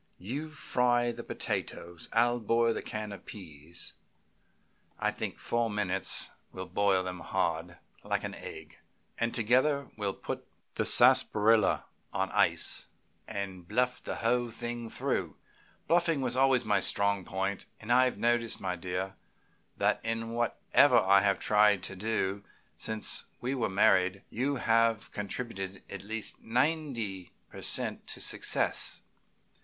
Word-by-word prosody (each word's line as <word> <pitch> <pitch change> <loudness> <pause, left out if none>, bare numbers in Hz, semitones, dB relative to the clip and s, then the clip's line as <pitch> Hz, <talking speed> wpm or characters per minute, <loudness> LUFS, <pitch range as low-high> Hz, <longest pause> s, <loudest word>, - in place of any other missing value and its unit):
You 135 - -5
fry 125 -4 +1
the - - -8
potatoes 85 -1 -4
and 115 - +2
I'll 120 +1 +3
boil 115 +1 +2
the - - -4
can 105 -1 -5
of 100 - -10
pease; 85 -4 -8 1.0
I - - +1
think - - -5
four 115 -1 0
minutes 100 -3 0 0.2
will 95 - -6
boil 95 +1 +2
them 90 -1 -5
hard, 85 -1 -2 0.3
like - - -1
an - - -4
egg, 80 +1 -10 0.4
and 115 0 +1
together 130 +5 +2
we'll 100 -2 -2
put - - -6 0.3
the - - +1
sarsaparilla 110 +1 +4 0.3
on 95 0 -1
ice, - - +2 0.4
and 95 -3 -5
bluff 125 +3 0
the - - -4
whole 120 +1 +1
thing 120 0 -4
through. - - -2 0.5
Bluffing 170 -4 +3
was 125 -1 0
always 130 -2 +3
my 105 -2 +3
strong 100 0 +1
point, 95 +2 -3
and 110 +2 -5
I 130 +1 +6
have 125 - -1
noticed, 120 -1 +1
my 90 -2 -2
dear, 90 +2 -4 0.6
that - - +1
in 115 0 -2
whatever 120 +3 +3
I 100 +1 +5
have 100 -1 +2
tried 105 -2 +4
to 100 - -5
do 100 -1 -1 0.3
since 110 -1 -1
we 125 +2 -2
were 130 -4 0
married 95 0 +3
you 135 +5 0
have 115 -3 +2
contributed 100 -2 -5
at 100 - -6
least 110 +2 -3
ninety 120 - -1 0.2
per - - -9
cent. - - -1
to - - -4
success. - - 0
110 Hz, 140 wpm, -30 LUFS, 95-120 Hz, 1.0 s, I